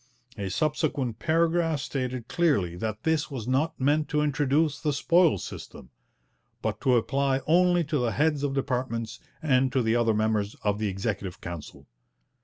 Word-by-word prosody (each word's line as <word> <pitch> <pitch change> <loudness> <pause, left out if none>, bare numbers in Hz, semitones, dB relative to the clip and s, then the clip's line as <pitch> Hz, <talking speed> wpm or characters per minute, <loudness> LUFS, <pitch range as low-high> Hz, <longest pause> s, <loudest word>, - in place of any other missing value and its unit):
A 100 -3 -4
subsequent 140 - -1
paragraph 165 -1 +1
stated 130 -3 -4
clearly 140 - +1
that 110 +3 -4
this 160 -2 +1
was 125 -6 -6
not 150 +6 0
meant 150 +3 +1
to 150 - +1
introduce 145 +1 +1
the 150 -2 0
'spoils 165 - +3
system,' 65 - -9 0.7
but - - -2
to 130 -2 +3
apply 135 +3 +1
only 175 +1 +4
to 150 -1 -1
the 120 -2 0
heads 150 -1 +1
of 140 -1 -1
departments 125 -4 -2 0.2
and 130 -3 +3
to 130 -2 +1
the 110 +1 +2
other 115 -2 +2
members 110 -1 0
of 105 0 0
the 110 - 0
Executive 95 -1 -3
Council. 85 -3 -8
135 Hz, 160 wpm, -27 LUFS, 110-155 Hz, 0.7 s, only